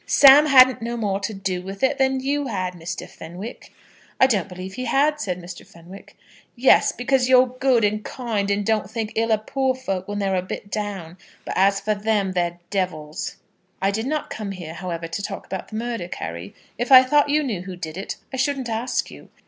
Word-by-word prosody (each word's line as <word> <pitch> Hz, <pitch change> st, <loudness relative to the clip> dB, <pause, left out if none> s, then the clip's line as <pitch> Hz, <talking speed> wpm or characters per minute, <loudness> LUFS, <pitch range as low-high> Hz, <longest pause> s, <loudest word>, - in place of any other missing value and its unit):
"Sam 285 Hz, +2 st, +8 dB
hadn't 260 Hz, -3 st, +6 dB
no 235 Hz, +1 st, -3 dB
more 200 Hz, -3 st, -1 dB
to 205 Hz, +2 st, -3 dB
do 190 Hz, -3 st, -3 dB
with 195 Hz, +3 st, -8 dB
it 275 Hz, +1 st, +2 dB
than 265 Hz, 0 st, +2 dB
you 285 Hz, +1 st, -1 dB
had, 185 Hz, -5 st, -2 dB
Mr. 175 Hz, 0 st, -6 dB
Fenwick." 180 Hz, +8 st, -9 dB, 0.5 s
"I -, -, +7 dB
don't 205 Hz, -7 st, 0 dB
believe 185 Hz, +1 st, -8 dB
he 255 Hz, +3 st, -5 dB
had," 295 Hz, +4 st, +2 dB
said 180 Hz, -7 st, -3 dB
Mr. 175 Hz, 0 st, -9 dB
Fenwick. 175 Hz, +4 st, -14 dB, 0.4 s
"Yes; 255 Hz, +2 st, +5 dB
because 255 Hz, 0 st, +1 dB
you're 255 Hz, 0 st, +7 dB
good, 255 Hz, -1 st, +1 dB
and 210 Hz, +1 st, +1 dB
kind, 220 Hz, -6 st, -3 dB
and 200 Hz, 0 st, 0 dB
don't 215 Hz, -3 st, 0 dB
think 220 Hz, -1 st, -4 dB
ill 225 Hz, 0 st, 0 dB
of 215 Hz, 0 st, +1 dB
poor 265 Hz, -1 st, 0 dB
folk 195 Hz, -8 st, -4 dB
when 205 Hz, 0 st, -4 dB
they're 195 Hz, -1 st, 0 dB
a 180 Hz, -, +1 dB
bit 195 Hz, +2 st, -7 dB
down. 190 Hz, -5 st, -5 dB, 0.3 s
But -, -, -4 dB
as 195 Hz, +1 st, +3 dB
for 215 Hz, +2 st, 0 dB
them, 205 Hz, -2 st, 0 dB
they're 175 Hz, -1 st, -1 dB
devils." 160 Hz, -6 st, -3 dB, 0.4 s
"I 195 Hz, +1 st, +1 dB
did 220 Hz, +4 st, -2 dB
not 305 Hz, +1 st, -2 dB
come 205 Hz, -3 st, -5 dB
here, 170 Hz, -4 st, -8 dB
however, 170 Hz, -1 st, -5 dB
to 165 Hz, +5 st, -4 dB
talk -, -, -6 dB
about 190 Hz, -, -6 dB
the 215 Hz, -, -9 dB
murder, 230 Hz, -5 st, -3 dB
Carry. 85 Hz, -, -7 dB, 0.2 s
If 245 Hz, +3 st, -2 dB
I 260 Hz, -1 st, +10 dB
thought 290 Hz, +2 st, +3 dB
you 300 Hz, +1 st, +2 dB
knew 220 Hz, -10 st, -3 dB
who 185 Hz, 0 st, -7 dB
did 160 Hz, -3 st, -7 dB
it, 195 Hz, -, -5 dB, 0.2 s
I -, -, -3 dB
shouldn't 270 Hz, -2 st, -1 dB
ask 230 Hz, +3 st, -2 dB
you. -, -, -13 dB
210 Hz, 215 wpm, -23 LUFS, 185-255 Hz, 0.5 s, I